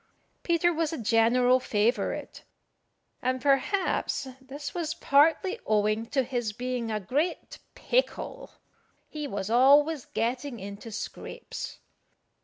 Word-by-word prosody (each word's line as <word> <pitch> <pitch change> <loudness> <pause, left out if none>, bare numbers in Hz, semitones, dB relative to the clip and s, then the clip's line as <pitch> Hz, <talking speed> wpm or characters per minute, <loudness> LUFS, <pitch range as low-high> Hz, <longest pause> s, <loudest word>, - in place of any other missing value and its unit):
Peter 345 0 +2
was 325 -1 0
a 325 - -3
general 240 +2 +4
favourite, 225 0 -1 0.8
and 255 +1 0
perhaps 280 +2 +1
this 280 +2 -7
was 335 -3 -2
partly 325 +9 +3
owing 215 +1 +1
to 270 +1 +1
his 240 -4 -2
being 245 0 -3
a 215 -1 -1
great 285 - -2 0.2
pickle. - - -1 0.6
He 300 -1 -5
was 200 -3 -4
always 285 +4 +5
getting 245 +2 -2
into 200 +3 -8
scrapes. 215 - -6
255 Hz, 110 wpm, -28 LUFS, 225-300 Hz, 0.8 s, always